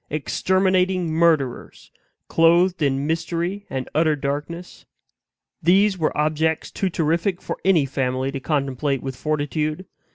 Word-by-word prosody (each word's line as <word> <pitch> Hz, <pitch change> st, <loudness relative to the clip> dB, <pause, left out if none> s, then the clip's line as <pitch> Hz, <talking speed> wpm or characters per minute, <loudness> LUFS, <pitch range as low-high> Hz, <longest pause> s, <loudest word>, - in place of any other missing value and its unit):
exterminating 180 Hz, +5 st, +1 dB
murderers! 160 Hz, -6 st, 0 dB, 0.4 s
clothed 170 Hz, +2 st, +3 dB
in 140 Hz, -1 st, +1 dB
mystery 170 Hz, +5 st, -2 dB
and 130 Hz, -1 st, -4 dB
utter 155 Hz, 0 st, +2 dB
darkness 150 Hz, +5 st, -5 dB, 0.8 s
these 190 Hz, +4 st, +4 dB
were 160 Hz, -4 st, -1 dB
objects 155 Hz, +1 st, 0 dB
too 195 Hz, -, -1 dB
terrific 170 Hz, +3 st, 0 dB
for -, -, -6 dB
any 180 Hz, -7 st, +4 dB
family 130 Hz, 0 st, -2 dB
to 135 Hz, -, -4 dB
contemplate 140 Hz, -1 st, -1 dB
with 135 Hz, -1 st, -4 dB
fortitude. 155 Hz, +4 st, -2 dB
160 Hz, 120 wpm, -22 LUFS, 140-175 Hz, 0.8 s, these